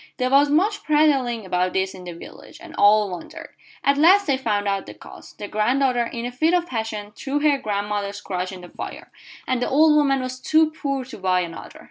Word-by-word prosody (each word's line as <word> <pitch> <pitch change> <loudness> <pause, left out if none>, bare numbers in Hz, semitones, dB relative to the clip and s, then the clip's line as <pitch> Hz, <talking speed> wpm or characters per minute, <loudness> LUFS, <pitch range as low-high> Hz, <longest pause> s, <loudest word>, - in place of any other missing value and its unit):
There 255 0 -1
was 285 +1 +5
much 395 +8 +1
prattling 275 -8 +2
about 180 0 0
this 190 0 -1
in 180 -1 -11
the 175 - -6
village, 165 - -13
and - - -12
all 210 -1 +4
wondered. 175 -2 -8 0.3
At 280 0 +2
last 380 +6 +6
they 275 - +2
found 210 -6 -1
out 195 -1 -1
the - - -10
cause. - - -13
The 205 - -8
granddaughter, 245 +4 +1
in 235 0 -5
a 245 - -4
fit 315 +8 +2
of 350 -1 +1
passion, 220 -6 -4
threw 275 +6 -3
her 290 -2 +3
grandmother's 205 -1 -3
crutch 185 -2 -4
in 185 -1 -9
the 180 - -12
fire, - - -8 0.4
and 255 -1 0
the - - 0
old 305 +2 +5
woman 280 -2 +3
was 255 0 -5
too 315 +4 +3
poor 275 -4 -3
to 260 - -11
buy 185 -1 +1
another. 170 -2 -8
245 Hz, 215 wpm, -22 LUFS, 200-285 Hz, 0.4 s, last